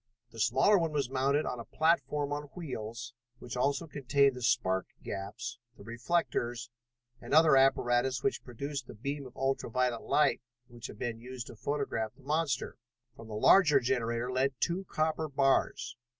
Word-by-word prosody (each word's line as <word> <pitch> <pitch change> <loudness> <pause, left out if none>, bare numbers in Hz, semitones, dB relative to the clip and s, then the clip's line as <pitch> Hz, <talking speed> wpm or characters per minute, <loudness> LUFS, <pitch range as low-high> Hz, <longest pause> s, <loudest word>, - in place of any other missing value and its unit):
The 115 - -11
smaller 135 - +4
one 165 -2 -1
was 140 -4 -1
mounted 140 +3 +1
on 125 - -3
a - - -5
platform 145 -2 +1
on 145 0 -4
wheels, 120 -7 -6 0.2
which - - -8
also 140 +6 0
contained 140 -2 +2
the 125 - -8
spark 95 -6 +1 0.2
gaps, 100 +4 -6 0.2
the - - -12
reflectors 120 -1 -2 0.5
and - - -1
other 160 -2 +7
apparatus 130 -1 +3
which 205 - 0
produced 140 +2 -5
the - - -10
beam 140 +4 -4
of 125 - -17
ultra 135 -2 -1
violet 125 0 0
light 150 - +2 0.3
which 120 -1 -9
had - - -11
been 115 -1 -4
used 125 0 -7
to - - -11
photograph 125 -4 -2
the 140 - -21
monster. 150 +1 -1 0.4
From 115 - -12
the 110 - -6
larger 150 - +6
generator 120 -1 -1
led 130 +1 +1
two 180 +6 -1
copper 155 -1 -1
bars. 135 -3 +1
130 Hz, 165 wpm, -31 LUFS, 120-145 Hz, 0.5 s, other